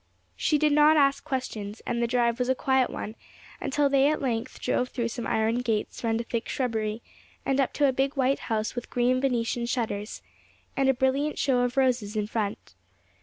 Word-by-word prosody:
She 305 Hz, -, +2 dB
did 300 Hz, 0 st, +2 dB
not 300 Hz, +1 st, +6 dB
ask 280 Hz, -1 st, +3 dB
questions, 230 Hz, -7 st, -4 dB
and 235 Hz, 0 st, -1 dB
the 235 Hz, -, +2 dB
drive 235 Hz, 0 st, +1 dB
was 250 Hz, 0 st, 0 dB
a 260 Hz, -, +3 dB
quiet 265 Hz, -1 st, +2 dB
one, 215 Hz, -, -5 dB, 0.5 s
until 285 Hz, +1 st, +1 dB
they 275 Hz, 0 st, +4 dB
at 305 Hz, -, 0 dB
length 240 Hz, -4 st, -3 dB
drove 250 Hz, -, 0 dB
through 235 Hz, -2 st, -2 dB
some 235 Hz, 0 st, -5 dB
iron 220 Hz, +2 st, +1 dB
gates 225 Hz, -3 st, -2 dB
round 225 Hz, -1 st, +1 dB
a -, -, -2 dB
thick 235 Hz, 0 st, -4 dB
shrubbery, 220 Hz, -3 st, -2 dB, 0.4 s
and 270 Hz, 0 st, +1 dB
up 265 Hz, -, 0 dB
to 290 Hz, -, +3 dB
a 265 Hz, -, +2 dB
big 270 Hz, +2 st, 0 dB
white 270 Hz, 0 st, +2 dB
house 220 Hz, -1 st, -1 dB
with 245 Hz, -1 st, -6 dB
green 250 Hz, +1 st, +1 dB
Venetian 240 Hz, -2 st, 0 dB
shutters, 215 Hz, -4 st, -3 dB, 0.5 s
and 270 Hz, -1 st, +2 dB
a -, -, +5 dB
brilliant 270 Hz, +4 st, 0 dB
show 260 Hz, -3 st, +2 dB
of 245 Hz, +2 st, 0 dB
roses 245 Hz, -5 st, +1 dB
in 210 Hz, -1 st, 0 dB
front. 210 Hz, -1 st, -4 dB
245 Hz, 200 wpm, -27 LUFS, 230-270 Hz, 0.5 s, not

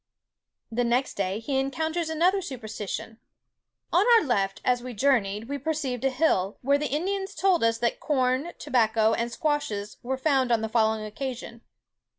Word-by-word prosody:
The 245 Hz, +2 st, 0 dB
next 245 Hz, +3 st, +1 dB
day 195 Hz, 0 st, -1 dB
he 265 Hz, +4 st, -1 dB
encounters 320 Hz, +5 st, -1 dB
another 355 Hz, +5 st, +2 dB
superstition:—"On 230 Hz, -, -5 dB
our -, -, +3 dB
left, 195 Hz, -7 st, 0 dB
as 250 Hz, -1 st, +2 dB
we 250 Hz, -1 st, -7 dB
journeyed, 215 Hz, -4 st, +1 dB
we 285 Hz, +1 st, -3 dB
perceived 275 Hz, -4 st, -2 dB
a 270 Hz, -, +3 dB
hill, 250 Hz, -, +1 dB
where 280 Hz, +2 st, +3 dB
the 295 Hz, -, -2 dB
Indians 385 Hz, +6 st, -2 dB
told 375 Hz, -6 st, +2 dB
us 230 Hz, 0 st, +3 dB
that 235 Hz, 0 st, -1 dB
corn, 265 Hz, +2 st, 0 dB
tobacco, 225 Hz, -2 st, +2 dB
and 235 Hz, +1 st, -1 dB
squashes 235 Hz, -8 st, -2 dB
were 265 Hz, +1 st, -2 dB
found 265 Hz, -3 st, +2 dB
on 230 Hz, -2 st, +3 dB
the 220 Hz, -, -2 dB
following 220 Hz, -1 st, +1 dB
occasion. 235 Hz, +1 st, -6 dB
255 Hz, 160 wpm, -26 LUFS, 225-295 Hz, -, our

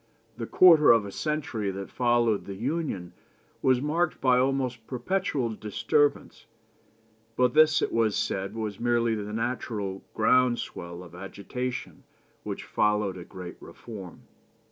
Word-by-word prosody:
The -, -, -4 dB
quarter 165 Hz, -5 st, +7 dB
of 115 Hz, -3 st, +6 dB
a 100 Hz, -, -7 dB
century 135 Hz, -7 st, -2 dB
that 95 Hz, 0 st, -6 dB
followed 120 Hz, -4 st, +2 dB
the 100 Hz, -, -6 dB
Union 115 Hz, -, -3 dB, 0.5 s
was 130 Hz, 0 st, +3 dB
marked 165 Hz, +3 st, 0 dB
by 125 Hz, -1 st, +4 dB
almost 130 Hz, -3 st, -1 dB
perpetual 135 Hz, -1 st, -1 dB
disturbance; 110 Hz, +7 st, 0 dB, 0.9 s
but 125 Hz, 0 st, +2 dB
this 155 Hz, 0 st, +5 dB
it -, -, -1 dB
was 115 Hz, -2 st, +2 dB
said 95 Hz, +2 st, -2 dB
was 110 Hz, -3 st, -4 dB
merely 120 Hz, -1 st, +2 dB
the 105 Hz, -1 st, -4 dB
natural 105 Hz, -4 st, -3 dB
ground 125 Hz, +2 st, +4 dB
swell 85 Hz, +1 st, -7 dB
of 85 Hz, -2 st, -14 dB
agitation 100 Hz, +7 st, -6 dB, 0.4 s
which -, -, -5 dB
followed 105 Hz, -2 st, +1 dB
a 90 Hz, -, -8 dB
great 90 Hz, -1 st, -9 dB
reform. 100 Hz, -7 st, -10 dB
115 Hz, 135 wpm, -27 LUFS, 100-130 Hz, 0.9 s, quarter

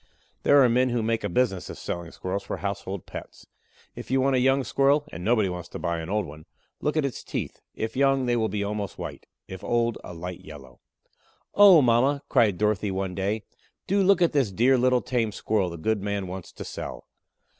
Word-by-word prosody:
There 145 Hz, -1 st, +6 dB
are -, -, +6 dB
men 125 Hz, +2 st, +2 dB
who 120 Hz, -2 st, 0 dB
make 115 Hz, 0 st, 0 dB
a -, -, -1 dB
business 120 Hz, -8 st, 0 dB
of -, -, -7 dB
selling 85 Hz, -1 st, -5 dB
Squirrels 95 Hz, +4 st, -4 dB
for -, -, -5 dB
household 100 Hz, -2 st, -4 dB
pets. -, -, -10 dB, 0.5 s
If -, -, -9 dB
you 135 Hz, +1 st, +2 dB
want 135 Hz, 0 st, +2 dB
a -, -, +3 dB
young 135 Hz, +2 st, +3 dB
Squirrel 140 Hz, +3 st, +2 dB
and 90 Hz, -, -7 dB
nobody 110 Hz, -2 st, +3 dB
wants 90 Hz, -1 st, -6 dB
to -, -, -7 dB
buy 85 Hz, -1 st, -2 dB
an 80 Hz, +1 st, -6 dB
old 105 Hz, 0 st, 0 dB
one 75 Hz, 0 st, -11 dB, 0.3 s
look 150 Hz, +1 st, -1 dB
at 155 Hz, -, +2 dB
its 135 Hz, -, -4 dB
teeth; -, -, -5 dB
if 110 Hz, 0 st, -4 dB
young, 135 Hz, -1 st, +3 dB
they 120 Hz, -1 st, +1 dB
will 110 Hz, -2 st, +1 dB
be 100 Hz, +1 st, -2 dB
almost 100 Hz, -1 st, -4 dB
white; -, -, -7 dB, 0.2 s
if 95 Hz, -1 st, -9 dB
old, 120 Hz, -1 st, 0 dB
a 90 Hz, -, -9 dB
light 90 Hz, +1 st, -6 dB
yellow. 70 Hz, -5 st, -12 dB, 0.7 s
"Oh, 195 Hz, -7 st, +8 dB
mama," 130 Hz, +4 st, +3 dB
cried 105 Hz, -6 st, +3 dB
Dorothy 105 Hz, 0 st, +1 dB
one 95 Hz, -1 st, -2 dB
day, 100 Hz, +4 st, -2 dB, 0.4 s
"do 200 Hz, +1 st, +2 dB
look 190 Hz, -2 st, +4 dB
at 170 Hz, -, +3 dB
this 135 Hz, -9 st, +1 dB
dear 120 Hz, +7 st, +4 dB
little 125 Hz, 0 st, +2 dB
tame 120 Hz, -4 st, 0 dB
Squirrel 100 Hz, -1 st, 0 dB
the 85 Hz, -, -7 dB
good 105 Hz, +5 st, -1 dB
man 100 Hz, -1 st, -2 dB
wants 95 Hz, 0 st, -7 dB
to -, -, -8 dB
sell. -, -, -7 dB
110 Hz, 215 wpm, -26 LUFS, 95-130 Hz, 0.7 s, Oh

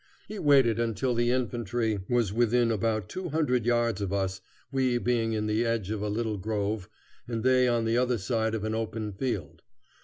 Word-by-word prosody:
He 215 Hz, -, -6 dB
waited 135 Hz, -6 st, +4 dB
until 115 Hz, +2 st, 0 dB
the 120 Hz, 0 st, +1 dB
infantry 120 Hz, -3 st, -1 dB
was 120 Hz, -5 st, +1 dB
within 120 Hz, +1 st, +3 dB
about 110 Hz, -2 st, 0 dB
two 185 Hz, -2 st, -5 dB
hundred 125 Hz, -7 st, +1 dB
yards 120 Hz, -4 st, +1 dB
of 100 Hz, -2 st, -2 dB
us, 95 Hz, -1 st, -1 dB, 0.3 s
we 130 Hz, -2 st, +1 dB
being 120 Hz, -2 st, 0 dB
in 105 Hz, -1 st, -1 dB
the 105 Hz, +2 st, +1 dB
edge 115 Hz, -4 st, -1 dB
of 110 Hz, -2 st, -2 dB
a 105 Hz, -, -1 dB
little 110 Hz, 0 st, -1 dB
grove, 105 Hz, -1 st, -2 dB, 0.4 s
and 115 Hz, -2 st, -3 dB
they 130 Hz, 0 st, +4 dB
on 120 Hz, -2 st, +1 dB
the 115 Hz, +1 st, +1 dB
other 125 Hz, -1 st, +1 dB
side 110 Hz, +2 st, -1 dB
of 105 Hz, -, -3 dB
an 110 Hz, 0 st, -1 dB
open 110 Hz, -1 st, -3 dB
field. 100 Hz, -, -4 dB
115 Hz, 190 wpm, -28 LUFS, 105-120 Hz, 0.4 s, waited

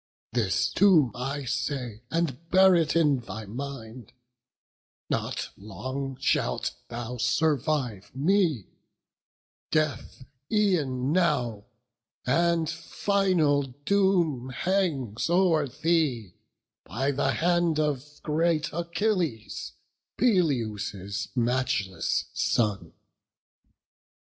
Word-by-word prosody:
This 95 Hz, -6 st, +1 dB
too 170 Hz, -, +5 dB
I 135 Hz, +3 st, -4 dB
say, 130 Hz, -4 st, -3 dB
and 165 Hz, -1 st, -2 dB
bear 190 Hz, 0 st, +6 dB
it 165 Hz, -3 st, +2 dB
in 150 Hz, -5 st, +3 dB
thy 110 Hz, -2 st, -7 dB
mind; 120 Hz, -1 st, -7 dB, 1.0 s
Not -, -, -2 dB
long 130 Hz, +7 st, -5 dB
shalt -, -, 0 dB, 0.2 s
thou 120 Hz, +1 st, -5 dB
survive 125 Hz, -3 st, 0 dB
me; 160 Hz, -, +2 dB, 1.0 s
death 150 Hz, -4 st, -1 dB, 0.3 s
e'en 150 Hz, -, +1 dB
now 135 Hz, -, +1 dB, 0.6 s
And 165 Hz, +4 st, +2 dB
final 170 Hz, -3 st, +1 dB
doom 150 Hz, 0 st, +1 dB
hangs 145 Hz, -, -1 dB
o'er 170 Hz, -4 st, +3 dB
thee, 140 Hz, -, 0 dB, 0.5 s
by 130 Hz, +10 st, -1 dB
the 135 Hz, 0 st, 0 dB
hand 175 Hz, -2 st, +2 dB
Of 150 Hz, -1 st, -2 dB
great 160 Hz, 0 st, +1 dB
Achilles, 170 Hz, -, -2 dB, 0.4 s
Peleus' 110 Hz, -, 0 dB
matchless 120 Hz, -7 st, 0 dB
son." 105 Hz, -4 st, 0 dB
140 Hz, 85 wpm, -27 LUFS, 120-170 Hz, 1.0 s, bear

